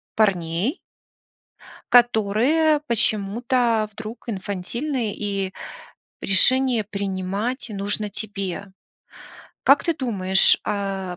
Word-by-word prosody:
парней 195 - 0 1.1
которые, 245 +7 +3
почему-то, 225 +1 0
вдруг 220 +4 -9
инфантильны, 220 +5 -3
и 195 -2 -3 0.7
решение 250 +4 +4
принимать 200 +5 -3
нужно 205 +1 -2
тебе. 195 -2 -5 0.9
Как - - +5
ты 335 - +1
думаешь, 195 -9 +3
э, 195 -3 -3
210 Hz, 75 wpm, -22 LUFS, 195-240 Hz, 1.1 s, Как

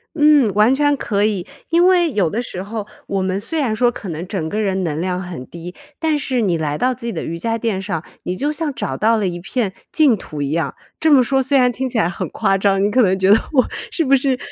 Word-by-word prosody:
嗯， 295 -6 +5
完 215 +5 +5
全 290 +1 +2
可 205 -5 -1
以。 205 -4 0 0.2
因 340 +2 +4
为 350 -3 +3
有 195 -9 +1
的 230 - -1
时 185 -6 -6
候， 210 0 -5 0.2
我 195 -1 -1
们 190 +1 -1
虽 315 +10 -2
然 245 -7 0
说 240 +2 +3
可 220 -5 -8
能 165 +2 -5
整 180 -5 -3
个 210 - -2
人 190 -2 0
能 155 -3 -2
量 180 +1 -2
很 175 -8 -7
低， 170 +1 -9 0.2
但 315 -2 +1
是 260 -4 -1
你 185 -6 +1
来 150 -2 -2
到 255 0 +1
自 235 - -10
己 235 - -2
的 165 - -4
瑜 165 - -4
伽 225 +6 -1
垫 220 -4 -1
上， 175 -5 -3 0.2
你 180 - -3
就 290 +10 -1
像 305 -1 -2
找 130 - -4
到 225 +2 +3
了 205 -3 0
一 175 -1 -4
片 200 +3 -2 0.2
净 290 -8 +4
土 150 -5 -7
一 140 - -1
样。 155 -4 -1 0.3
这 315 - +3
么 270 -3 +7
说 270 +2 +1
虽 275 +2 +2
然 250 -1 +4
听 260 +2 -3
起 245 - -4
来 175 - +2
很 175 - -4
夸 195 - +1
张， 195 0 +2
你 205 - +2
可 255 +5 +3
能 190 -2 +2
觉 190 0 +2
得 210 - +8 0.2
我 260 -3 +4 0.2
是 335 - 0
不 275 -2 +4
是 265 -1 +1
215 Hz, 285 characters per minute, -19 LUFS, 185-260 Hz, 0.3 s, 得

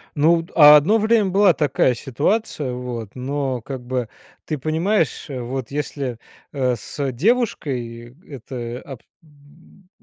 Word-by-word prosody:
Ну, 160 +4 +4
вот 165 0 -5
одно 150 +7 +7
время 220 -1 +3
была 195 0 +5
такая 135 -4 +1
ситуация, 145 - -1
вот, 125 -4 -6
но 135 0 -3
как 130 +1 -7
бы, 125 -2 -2 0.4
ты 155 - -3
понимаешь, 160 - 0
э, 135 -3 -5
вот 125 0 -5
если, 140 -4 -4 0.3
э, 130 -3 0
с 135 +5 -4
девушкой 125 - -1
это 125 -2 -7
об 135 -5 -9 0.2
м. 155 +5 -22
140 Hz, 130 wpm, -21 LUFS, 125-160 Hz, 0.4 s, одно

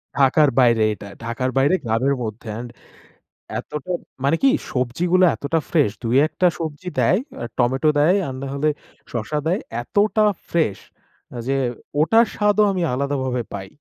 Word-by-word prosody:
ঢাকার 140 +2 +4
বাইরে 115 -3 +4
এটা। 100 - -10 0.2
ঢাকার 125 +2 -2
বাইরে 140 +7 +4
গ্রামের 125 +5 +1
মধ্যে 110 +1 -6
and 120 0 -7 0.9
এতটা 150 +4 -6 0.3
মানে 140 +4 +3
কী 270 - +7 0.2
সবজিগুলো 170 +9 +1
এতটা 160 +3 -1
fresh। 145 -11 +2
দুই 115 +2 0
একটা 180 - +1
সবজি 160 +3 -5
দেয়, 160 - +3 0.4
টমেটো 130 +5 +2
দেয় 170 +6 +4
আর 130 - -4
নাহলে 140 +2 -1 0.4
শসা 120 +6 -3
দেয়। 180 +5 +1 0.2
এতটা 210 - +2 0.3
fresh 160 - 0 0.7
যে 135 - +1 0.4
ওটার 225 +9 +5
স্বাদও 210 0 +3
আমি 185 -2 -2
আলাদাভাবে 130 -2 -1
পাই। 95 -1 -6
140 Hz, 140 wpm, -21 LUFS, 120-170 Hz, 0.9 s, কী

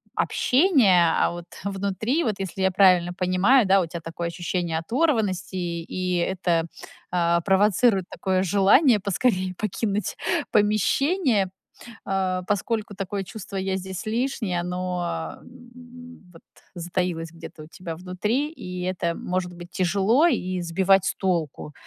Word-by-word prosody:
общения, 245 - +3
а - - +2
вот 175 0 -8 0.2
внутри, 200 - -1
вот, 215 -4 0
если 190 0 -5
я 190 - +3
правильно 180 -2 +4
понимаю, 190 +7 +3
да, 195 0 +4
у 170 - -2
тя 170 +1 -6
такое 165 +1 -5
ощущение 170 -1 -2
оторванности, 205 - 0
и 170 -2 -3 0.3
и 175 - +1
это, 170 -2 0 0.4
а, 170 -1 +2
провоцирует 195 +1 +3
такое 190 -1 -1
желание- 205 - +4
поскорее 190 -2 0
покинуть 210 0 -2 0.4
помещение, 215 - +2 0.6
а, 190 -1 -1
поскольку 210 0 -2
такое 195 0 -4
чувство 195 +2 -8
"я 190 0 -1
здесь 190 -1 -6
лишний", 225 -4 -1
оно, 175 - -3
м, 245 -1 -14
вот, 165 - -15 0.3
затаилось 175 -2 -3
где-то 165 -2 -11
у 155 - -12
тебя 170 -1 -7
внутри, 210 - -2
и 180 - -7
это, 180 -2 -1
может 180 -1 -3
быть, 175 0 -11
тяжело 200 - +2
и 185 - -1
сбивать 190 +3 +2
с - - 0
толку. 165 -5 -2
190 Hz, 135 wpm, -24 LUFS, 175-210 Hz, 0.6 s, правильно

